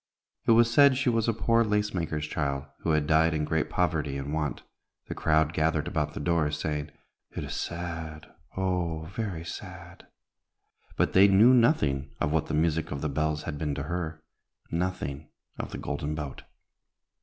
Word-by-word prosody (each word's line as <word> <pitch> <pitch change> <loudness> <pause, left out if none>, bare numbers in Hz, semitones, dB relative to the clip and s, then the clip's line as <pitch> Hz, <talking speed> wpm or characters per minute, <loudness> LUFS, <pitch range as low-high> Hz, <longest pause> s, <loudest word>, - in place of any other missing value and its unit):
It 115 - +7
was 115 0 +4
said 140 -1 +6
she 130 -2 +2
was 115 -1 +1
a - - +4
poor 115 +1 +2
lace 105 -1 0
maker's 80 -4 -2
child, 70 -2 -2
who - - -3
had 75 -1 +2
died 80 +1 +3
in 75 -1 0
great 80 0 0
poverty 80 -6 0
and 70 +2 -4
want. 75 -3 -2 0.4
The - - -5
crowd 80 0 +2
gathered 80 -2 +1
about - - -2
the - - -4
door, 85 -3 +1
saying, 75 0 -3 0.5
"It - - -3
is - - -5
sad, 80 -3 -5 0.3
oh! 90 -4 -1
very 95 -8 -4
sad!" 80 - -9 0.9
but - - +1
they 95 +2 +7
knew 105 +6 +6
nothing 75 - +3
of 75 - 0
what 80 -1 +1
the - - -1
music 80 0 +1
of 70 -1 -4
the 75 - -1
bells 75 +1 -1
had 75 -3 -5
been 75 -2 -1
to 70 - -3
her 80 -1 -4 0.5
nothing 80 -5 -3 0.3
of - - -4
the - - -6
Golden 75 +1 -3
Boat. 75 -3 -6
80 Hz, 180 wpm, -28 LUFS, 75-90 Hz, 0.9 s, It